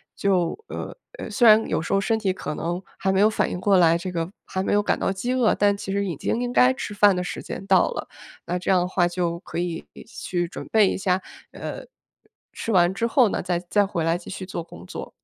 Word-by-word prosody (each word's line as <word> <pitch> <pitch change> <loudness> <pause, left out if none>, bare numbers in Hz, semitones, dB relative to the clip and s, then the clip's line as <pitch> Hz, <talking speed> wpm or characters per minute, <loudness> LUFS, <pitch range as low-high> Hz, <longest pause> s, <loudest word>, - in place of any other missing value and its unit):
就， 185 -4 +1
呃 - - -6 0.2
呃， - - -6
虽 235 +3 +4
然 220 0 +6
有 - - 0
时 160 - -5
候 195 - +4
身 225 +2 +1
体 200 -3 0
可 185 -4 -5
能 175 +3 -2 0.2
还 190 - +1
没 190 - +2
有 210 - +7
反 220 - 0
应 - - -4
过 195 +1 +3
来， 170 -2 +5
这 180 +1 -5
个 165 0 -3
还 190 - -3
没 - - -1
有 205 - +4
感 - - 0
到 - - 0
饥 240 +7 -2
饿， 250 -4 +3
但 205 0 +3
其 200 -1 -6
实 200 +1 0
已 175 -4 -3
经 225 - -2
应 245 0 -2
该 250 +1 +6
吃 260 - -6
饭 205 -1 +5
的 180 - -1
时 - - -5
间 195 - -7
到 190 -2 +4
了， - - -5 0.4
那 175 +1 -2
这 180 - -4
样 185 - +5
的 180 - 0
话 180 -1 +2
就 170 -1 -2
可 - - -8
以 175 -2 -3 0.2
去 185 -5 -3
准 170 - -8
备 215 -3 +5
一 - - -2
下， 190 -1 0 0.3
呃， - - -7 0.7
吃 225 - -4
完 180 -2 +4
之 230 +4 -1
后 245 -2 +4
呢， - - -2
再 175 0 -1
再 185 +4 +1
回 175 -4 -2
来 165 +1 +2
继 175 - -11
续 190 -1 -6
做 180 -2 -5
工 90 - -13
作。 - - -7
190 Hz, 275 characters per minute, -24 LUFS, 175-205 Hz, 0.7 s, 有